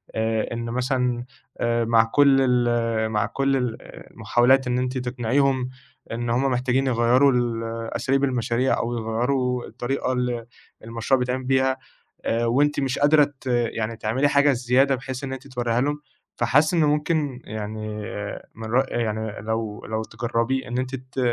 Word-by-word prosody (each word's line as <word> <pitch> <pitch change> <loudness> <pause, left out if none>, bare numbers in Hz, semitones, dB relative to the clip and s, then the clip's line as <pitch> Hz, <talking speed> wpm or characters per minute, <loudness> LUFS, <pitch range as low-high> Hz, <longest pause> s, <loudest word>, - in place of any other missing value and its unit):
آآ، 110 +1 -1
إن 115 0 -4
مثلًا 125 0 -1 0.3
آآ، 115 0 +1
مع 115 0 +5
كل 135 +4 +4
ال 120 -3 +1
مع 105 -2 +1
كل 135 0 0
ال 125 -3 -2 0.3
المحاولات 130 +2 +3
إن 125 0 0
أنتِ 125 +1 -2
تقنعيهم 125 +1 0 0.4
إن 120 +1 -3
همّ 130 +3 +1
محتاجين 130 +2 +1
يغيروا 125 +3 +4
ال 120 -2 0 0.3
أساليب 135 +1 +1
المشاريع 125 -1 +1
أو 120 +1 -2
يغيروا 125 +3 -1
الطريقة 125 +2 -2
اللي 125 -2 -1 0.4
المشروع 115 +4 0
بيتعمل 125 +1 -1
بيها 130 0 +2 0.5
آآ، 115 +1 +1
وأنتِ 145 +5 +2
مش 135 -1 -1
قادرة 150 +1 +6 0.2
ت - - -17
يعني 115 -2 0
تعملي 125 +7 +1
حاجة 140 +1 +4
الزيادة 130 +2 +2
بحيث 130 +1 -6
إن 135 - -3
أنتِ 135 +1 -8
توريها 120 -2 -1
لهم؟ 145 +2 -1 0.3
فحاسس 145 +8 +3
إنّه 160 -3 +3
ممكن 150 -3 0
يعني 110 0 -5 0.6
من 115 0 -7
رأ 130 +3 +4
يعني 110 -2 -2
لو 110 -1 -3
لو 110 0 -2
تجرّبيه 120 +3 -2
إن 120 - -3
أنتِ 130 +1 -2
ت 130 +1 -8
125 Hz, 155 wpm, -24 LUFS, 115-135 Hz, 0.6 s, قادرة